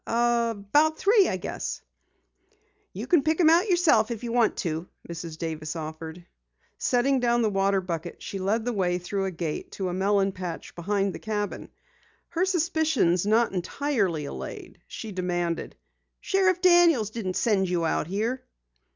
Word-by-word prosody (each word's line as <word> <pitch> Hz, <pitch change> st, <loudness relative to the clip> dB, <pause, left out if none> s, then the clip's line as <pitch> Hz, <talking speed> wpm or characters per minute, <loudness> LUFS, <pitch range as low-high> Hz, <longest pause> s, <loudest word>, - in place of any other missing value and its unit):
"About 235 Hz, +5 st, +2 dB
three, 405 Hz, -1 st, +4 dB
I -, -, -1 dB
guess." -, -, -5 dB, 1.1 s
"You -, -, -6 dB
can 345 Hz, -5 st, +4 dB
pick 315 Hz, +3 st, 0 dB
'em 320 Hz, -2 st, +6 dB
out 350 Hz, +6 st, +4 dB
yourself 330 Hz, -, +4 dB
if 235 Hz, -1 st, -5 dB
you 235 Hz, -, -3 dB
want 235 Hz, -2 st, +2 dB
to," 165 Hz, -1 st, -3 dB, 0.2 s
Mrs. 165 Hz, -1 st, -7 dB
Davis 160 Hz, -1 st, -4 dB
offered. 160 Hz, +2 st, -7 dB, 0.5 s
Setting 260 Hz, +2 st, +2 dB
down 240 Hz, -1 st, +2 dB
the 215 Hz, -, +1 dB
water 195 Hz, 0 st, +2 dB
bucket, 170 Hz, -2 st, -5 dB
she 195 Hz, -, -6 dB
led 215 Hz, +4 st, 0 dB
the 245 Hz, -, -1 dB
way 180 Hz, -4 st, +1 dB
through 195 Hz, +2 st, -3 dB
a -, -, -1 dB
gate 165 Hz, -3 st, -5 dB
to 190 Hz, -2 st, -3 dB
a -, -, -3 dB
melon 195 Hz, +1 st, +2 dB
patch 180 Hz, -3 st, -6 dB
behind 195 Hz, +2 st, -1 dB
the -, -, -7 dB
cabin. 205 Hz, -2 st, -4 dB, 0.6 s
Her 345 Hz, +3 st, 0 dB
suspicions 315 Hz, -, +1 dB
not 225 Hz, +2 st, +3 dB
entirely 190 Hz, -, -1 dB
allayed, -, -, -8 dB
she 220 Hz, -, -7 dB
demanded: 175 Hz, -2 st, -2 dB, 0.4 s
"Sheriff 375 Hz, -2 st, +1 dB
Daniels 340 Hz, -, +5 dB
didn't 195 Hz, -5 st, -4 dB
send 195 Hz, -5 st, +1 dB
you 175 Hz, -2 st, 0 dB
out 155 Hz, -, 0 dB
here?" 220 Hz, +8 st, -2 dB
205 Hz, 160 wpm, -26 LUFS, 180-255 Hz, 1.1 s, em